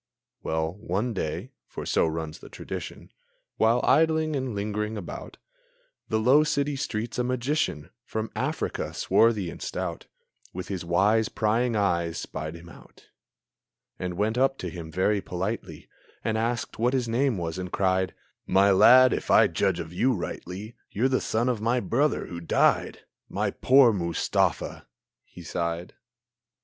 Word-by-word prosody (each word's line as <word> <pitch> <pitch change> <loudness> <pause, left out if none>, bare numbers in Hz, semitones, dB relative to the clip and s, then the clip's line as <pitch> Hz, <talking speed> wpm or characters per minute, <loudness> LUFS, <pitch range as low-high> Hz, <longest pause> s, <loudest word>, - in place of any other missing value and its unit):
Well, 80 +3 -2
one 110 +4 -2
day 80 -6 -4 0.2
for - - -7
so - - +2
runs 80 -1 -4
the - - -12
tradition - - -7 0.5
While 115 +2 +3
idling 160 +1 +3
and 130 -5 -2
lingering 105 +1 -2
about 100 - -8 0.7
The 110 - +1
low 130 +7 +5
city 145 -1 0
streets, 120 -2 -3
a - - +2
Magician 125 - -1
From 110 -1 -4
Africa, 130 +8 -2
swarthy 110 -6 +2
and - - -11
stout, - - -4 0.5
With 90 0 -6
his 95 -3 -3
wise, 100 +6 +2
prying 115 +2 +1
eyes 85 -5 0
spied 80 +1 -5
him 85 +1 -12
out, 85 - -17 0.9
And 90 -1 -3
went 110 +4 0
up 135 +1 +2
to 90 - -5
him 80 -1 -8
very 95 +4 +1
politely, 95 +6 -5 0.4
And 110 - 0
asked 115 0 -2
what 120 +3 +2
his 125 -3 0
name 120 0 +1
was 85 0 -4
and 90 0 -5
cried: 95 -1 +1 0.3
"My 100 +1 +4
lad, 130 +6 +7
if - - -4
I - - +7
judge 95 -3 0
of 85 0 -6
you 125 +7 +2
rightly, 95 +4 -6
You're 125 +6 +1
the 130 - +1
son 115 +3 0
of 120 -4 0
my 120 +3 +2
brother 140 +5 0
who 85 -1 -7
died 85 - +2 0.3
My - - -1
poor 130 -3 +5
Mustafa!" 85 -4 0
and - - -17 0.4
he 90 - -13
sighed. 85 +1 -3
105 Hz, 155 wpm, -26 LUFS, 90-125 Hz, 0.9 s, lad